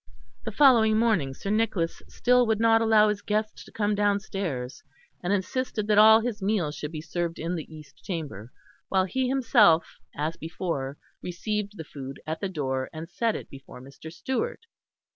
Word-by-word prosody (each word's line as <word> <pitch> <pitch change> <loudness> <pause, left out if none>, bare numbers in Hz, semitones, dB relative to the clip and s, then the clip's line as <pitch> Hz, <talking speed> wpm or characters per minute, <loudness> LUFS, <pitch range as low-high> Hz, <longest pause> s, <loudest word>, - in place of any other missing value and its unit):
The - - -3
following 230 -7 +5
morning 205 -13 +1
Sir 200 - -4
Nicholas 210 -6 0
still 250 -1 +2
would 220 -1 +1
not 225 0 +4
allow 220 -1 +5
his 210 -1 -2
guest 215 +1 -2
to - - -15
come 210 -1 0
downstairs, 200 - -2 0.4
and 175 - -1
insisted 215 +2 -1
that 210 0 +4
all 220 +1 +8
his 225 -3 -3
meals 190 -7 0
should 150 0 -6
be 155 -2 -5
served 170 +1 -3
in 165 +3 -3
the 160 -2 -6
East 150 -3 -14
Chamber, 145 - -6 0.4
while 190 -1 +2
he 260 +7 -1
himself, 225 -10 +4 0.2
as 155 +3 -2
before, 155 -5 -4 0.2
received 205 +3 -4
the 160 - -6
food 135 -2 -9
at 160 +1 -4
the 195 - -2
door 130 -6 -2
and 165 +1 -8
set 225 +4 0
it - - -6
before 135 -2 -12
Mr. 140 +5 -11
Stewart. 265 - -3
195 Hz, 175 wpm, -26 LUFS, 155-220 Hz, 0.4 s, all